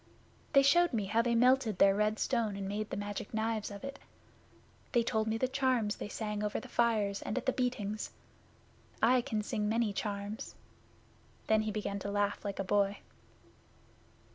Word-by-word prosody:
They 275 -1 +7
showed 345 +3 +4
me 215 -4 0
how 220 +4 +2
they 235 0 +1
melted 245 -3 +4
their 195 +1 +6
red 210 +1 +1
stone 230 -5 0
and 195 -1 -4
made 210 +2 -3
the - - -4
Magic 205 +1 -5
Knives 220 -1 -1
of 200 -1 -9
it. 275 +1 -6 0.9
They 240 -2 +4
told 220 -2 0
me 220 0 0
the 255 - +1
charms 255 -5 +1
they - - -5
sang 210 -1 -3
over 210 - -1
the - - -10
fires 215 -4 +1
and 215 - -3
at 255 - -2
the 260 - +2
beatings. 215 -5 -2 0.9
I 250 +2 +4
can 220 -4 -2
sing 210 0 -1
many 225 -2 +1
charms.' 205 +1 -4 0.9
Then 220 0 +3
he 215 0 -2
began 200 -1 -3
to 200 - -4
laugh 205 0 0
like 200 -2 -4
a 195 - -1
boy. 200 +1 +1
215 Hz, 180 wpm, -32 LUFS, 205-235 Hz, 0.9 s, They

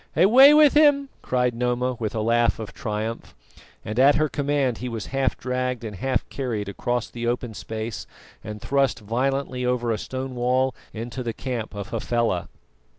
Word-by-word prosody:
"Away 240 - +8
with 300 -2 +6
him!" 290 -2 +4
cried 125 -1 0
Noma 125 +1 -1
with 110 -1 -3
a 110 - 0
laugh 115 +1 +2
of 110 -2 -7
triumph; 110 -2 -4 0.5
and 110 +3 -3
at 140 +2 +6
her 155 0 +1
command 140 -3 0
he 125 - -4
was 115 -3 -5
half 135 -1 +1
dragged 125 -1 -2
and 105 -3 -6
half 135 +7 -1
carried 115 -7 -3
across 120 +4 -2
the 120 0 -5
open 120 -1 -2
space 110 +1 -6 0.4
and 105 0 -7
thrust 135 +1 +1
violently 130 +4 -1
over 125 -1 0
a 110 - -1
stone 130 0 -5
wall 125 +2 +1 0.2
into 120 +3 -6
the 115 -2 -3
camp 120 -5 -5
of 100 -1 -6
Hafela. 115 -5 -1
125 Hz, 170 wpm, -24 LUFS, 115-135 Hz, 0.5 s, Away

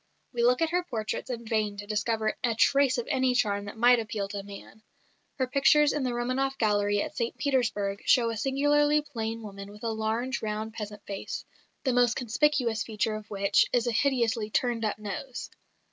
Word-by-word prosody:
We 240 - -1
look 250 +5 +4
at 325 - 0
her 355 +1 +2
portraits 225 -5 -4
in 235 -2 -5
vain 215 -2 -1
to 205 - -6
discover 215 +1 -1
a 235 -2 +1
trace 275 +2 +3
of 240 - -2
any 260 -3 +1
charm 205 -4 +1
that 205 +3 -8
might 245 +1 +6
appeal 215 -3 -3
to 200 -1 -4
man. 200 +2 -12 0.5
Her 260 - 0
pictures 280 +3 +4
in 295 - -1
the 255 - 0
Romanof 255 +3 -1
Gallery 205 -2 +2
at - - -7
St 235 0 -2
Petersburg 235 -7 0
show 235 -2 +4
a - - -4
singularly 290 +5 +2
plain 230 -5 -4
woman 200 -1 -8
with 210 +2 -13
a 230 - -1
large, 225 +4 -2
round 215 0 -3
peasant 210 -2 -7
face, 200 -1 -5 0.4
the 260 -3 +1
most 245 -1 +3
conspicuous 245 -2 +1
feature 220 0 -1
of 215 0 -7
which 200 -1 +3
is 245 -1 +2
a 240 - +1
hideously 230 -3 +1
turned 235 0 0
up 215 - -1
nose. 215 +5 -6
230 Hz, 190 wpm, -28 LUFS, 215-255 Hz, 0.5 s, might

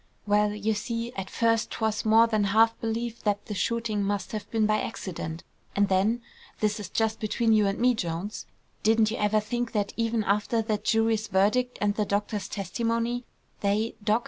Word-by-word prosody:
"Well, 210 0 +3
you 210 +1 0
see, 230 +3 -3
at 195 -3 -5
first 230 -1 +1
'twas 220 -1 -1
more 220 +1 +6
than 215 -3 +1
half 225 +3 +4
believed 230 +1 -3
that 205 -1 0
the 210 - -5
shooting 225 0 -1
must 200 -1 -2
have 215 -2 -5
been 220 -2 +1
by 215 0 +2
accident; 165 -6 -5 0.3
and 200 -1 +3
then, 210 +5 +2 0.4
this 215 0 0
is 200 -3 -6
just 220 -1 0
between 225 +1 +1
you 210 -2 +4
and 195 - -1
me, 250 +1 +4
Jones; 180 0 -4 0.3
didn't 220 0 +3
you 230 - -3
ever 210 +1 +2
think 240 +2 -3
that 205 -2 -1
even 230 -1 +1
after 210 +3 +1
that 215 -1 -2
jury's 225 -1 +2
verdict, 215 +7 +2
and 205 0 +2
the 210 0 0
doctor's 205 0 -1
testimony, 230 +5 -2 0.3
they, 210 +3 0
Doc. 215 +2 +3
215 Hz, 185 wpm, -27 LUFS, 205-230 Hz, 0.4 s, more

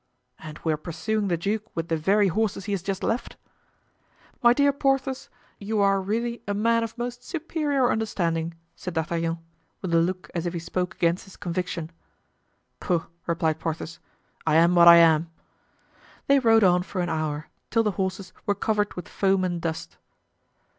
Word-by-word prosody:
"And 155 -1 -9
we 160 - +1
are - - -2
pursuing 200 +7 -2
the 175 -2 +1
duke 205 +5 -1
with 165 +1 -3
the 165 - +2
very 195 +6 +3
horses 200 0 -1
he 205 - -4
has 195 -3 -1
just 195 +2 -3
left?" 230 +2 -2 1.0
"My 240 - +7
dear 280 +3 +3
Porthos, 270 -1 0 0.3
you 210 +1 -2
are 195 -1 +3
really 230 +4 -2
a 205 - -1
man 230 +2 +2
of 230 +1 -6
most 245 +1 -5
superior 295 -5 0
understanding," 170 -7 -1 0.2
said 180 -2 -7
D'Artagnan, 165 +1 -1 0.4
with 185 -3 -4
a 165 - +5
look 180 +2 -2
as 175 0 -2
if 175 - -3
he - - -2
spoke 180 +2 -3
against 170 +1 0
his 195 - -15
conviction. 175 -2 -3 0.9
"Pooh!" 175 -3 0 0.2
replied 160 -2 0
Porthos, 165 +1 -4 0.5
"I 155 - +3
am 170 +2 +5
what 170 -1 +7
I 170 - +11
am." 165 -1 +5 1.0
They 280 0 +5
rode 225 -3 +5
on 180 -1 +5
for 185 0 -4
an 175 - -1
hour, 155 -1 -2 0.2
till 230 -1 +2
the 210 - +1
horses 190 0 -3
were 205 - +2
covered 210 -1 0
with 180 - -7
foam 195 -1 +1
and 175 -2 -2
dust. 165 0 -4
185 Hz, 175 wpm, -25 LUFS, 170-220 Hz, 1.0 s, I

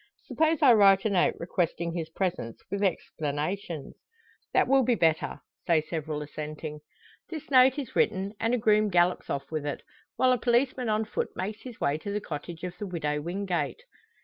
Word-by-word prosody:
Suppose 315 -1 +1
I 255 -4 +8
write 195 -2 +6
a 215 - +2
note 185 -3 +3
requesting 170 -1 -1
his 165 -2 -4
presence, 165 - -3
with 200 0 -2
explanations?" 160 -2 -2 0.6
"That - - +3
will 270 +1 +5
be 245 -1 +2
better," 160 -5 +1 0.3
say 165 -2 +4
several 155 -1 -4
assenting. 150 0 -6 0.5
This 310 -3 -7
note 260 0 +6
is 275 -4 -5
written, 195 +2 +1
and 230 +2 +1
a - - 0
groom 215 -1 +3
gallops 175 -1 +2
off 140 +1 -3
with 155 -2 -2
it; 145 - -4 0.3
while 255 0 +4
a 250 - +2
policeman 245 +1 +1
on 215 +1 +1
foot - - -2
makes 210 +4 -4
his 250 -3 -10
way 145 +2 0
to 200 - -5
the 205 - -1
cottage 165 -1 -7
of 180 -1 -4
the 205 - -4
Widow 150 -5 -2
Wingate. 185 - -2
190 Hz, 180 wpm, -28 LUFS, 160-225 Hz, 0.6 s, I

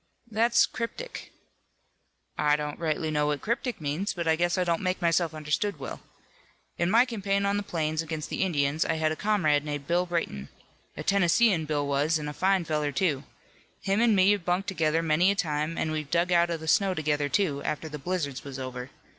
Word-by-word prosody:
"That's 230 +3 +4
cryptic." 485 - -6 1.0
"I 150 0 +3
don't 150 0 -4
rightly 160 -1 -1
know 150 -1 +1
what 145 -1 -1
'cryptic' 235 +2 -2
means, 165 +6 -2
but 170 -2 -3
I 160 - +4
guess 175 +2 0
I 185 - +2
don't 170 -2 0
make 185 0 -1
myself 170 -1 +2
understood 155 +7 -1
well. - - -7 0.8
In 170 0 +2
my 230 +5 +5
campaign 200 -4 -1
on 200 0 +1
the - - 0
plains 160 -4 -1
against 160 -1 -5
the - - -2
Indians 150 -4 +1
I - - -1
had 155 0 +1
a - - -1
comrade 155 -8 +2
named 145 -2 -4
Bill 175 +4 +1
Brayton. 165 - -3 0.5
A - - -4
Tennesseean, 195 -1 +3
Bill 145 -1 -1
was 145 +3 +1
an' 150 -1 -5
a 150 - -4
fine 190 +2 +2
feller, 150 -2 -1
too. 145 -2 0 0.6
Him 195 +3 +1
an' 230 -3 +4
me 190 +1 +5
have 205 -3 0
bunked 180 +3 0
together 165 -3 +1
many 165 +4 +3
a 200 - +2
time 155 -3 -1
an' 155 - -1
we've 155 -2 -3
dug 170 +2 +1
out 170 0 +4
of 165 -2 -3
the 160 - -7
snow 190 +4 +3
together, 150 -2 0
too, 150 -8 0
after 150 +1 -3
the 150 -1 -7
blizzards 145 -4 -3
was 140 -2 -7
over. 130 -1 -6
165 Hz, 205 wpm, -27 LUFS, 150-190 Hz, 1.0 s, my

